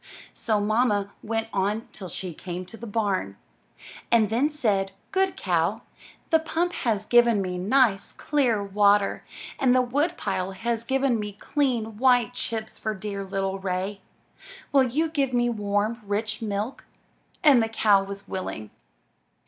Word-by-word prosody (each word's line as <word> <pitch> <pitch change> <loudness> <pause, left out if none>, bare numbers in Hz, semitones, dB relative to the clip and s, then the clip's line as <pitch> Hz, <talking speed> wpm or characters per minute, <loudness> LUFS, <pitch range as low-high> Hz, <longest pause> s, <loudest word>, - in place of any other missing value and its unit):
So 215 -2 0
mamma 205 -1 +1
went 225 0 -2
on 205 +3 0
till 185 -3 -8
she 180 -1 -5
came 180 +2 -6
to 185 - -11
the 235 +1 -8
barn, 200 - -1 0.7
and 220 -3 +4
then 255 +7 +2
said: 200 -10 0 0.2
Good 385 -1 +1
Cow, 180 +5 0 0.5
the 320 - +6
pump 335 +2 -1
has 215 -3 -1
given 240 -2 +5
me 180 -2 -2
nice, 210 0 +2
clear 250 -8 +1
water, 200 0 +3 0.4
and 255 -1 +4
the 255 - +5
wood 290 +8 0
pile 185 +1 -2
has 230 +3 -2
given 265 -1 +1
me 210 -1 -4
clean, 230 -2 -1
white 245 -2 +4
chips 225 -3 -4
for 215 -1 -2
dear 200 0 -5
little 195 0 -2
Ray. 190 +1 -3 0.7
Will 275 -2 +5
you 295 +7 0
give 280 -5 -1
me 240 0 +2
warm, 210 +2 -1
rich 215 +2 -2
milk?" 210 +3 -3 0.6
And 280 -6 +7
the 225 - 0
cow 205 -3 +4
was 200 0 -7
willing. 110 - -5
220 Hz, 150 wpm, -25 LUFS, 200-245 Hz, 0.7 s, And